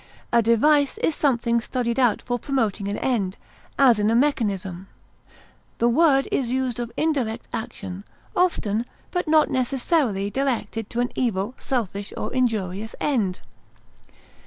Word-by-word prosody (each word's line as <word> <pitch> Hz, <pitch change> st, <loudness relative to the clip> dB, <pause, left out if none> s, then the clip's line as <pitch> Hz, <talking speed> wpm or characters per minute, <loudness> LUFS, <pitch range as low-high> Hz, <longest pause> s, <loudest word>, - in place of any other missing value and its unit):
A 235 Hz, -, +6 dB
device 280 Hz, +6 st, +3 dB
is 320 Hz, -, +1 dB
something 235 Hz, -5 st, +1 dB
studied 240 Hz, +1 st, -2 dB
out 245 Hz, -5 st, +2 dB
for 245 Hz, 0 st, -2 dB
promoting 220 Hz, -7 st, -1 dB
an 200 Hz, -, -2 dB
end, 205 Hz, -7 st, -1 dB, 0.4 s
as 250 Hz, -6 st, +5 dB
in 210 Hz, +1 st, +2 dB
a 225 Hz, -, +2 dB
mechanism; 200 Hz, -9 st, 0 dB, 0.9 s
the 235 Hz, -, +2 dB
word 275 Hz, +1 st, +4 dB
is 250 Hz, -3 st, 0 dB
used 255 Hz, -2 st, -1 dB
of 240 Hz, -1 st, -4 dB
indirect 255 Hz, -8 st, -1 dB
action, 195 Hz, -3 st, -5 dB, 0.3 s
often, 240 Hz, -, +1 dB, 0.2 s
but 355 Hz, -2 st, -1 dB
not 310 Hz, -1 st, +4 dB
necessarily 255 Hz, -, 0 dB
directed 240 Hz, -4 st, -2 dB
to 240 Hz, -, -1 dB
an 245 Hz, -, -1 dB
evil, 220 Hz, -2 st, -1 dB
selfish, 205 Hz, -5 st, -3 dB
or -, -, -4 dB
injurious 220 Hz, -4 st, -1 dB
end. 215 Hz, -11 st, 0 dB
235 Hz, 135 wpm, -24 LUFS, 210-270 Hz, 0.9 s, A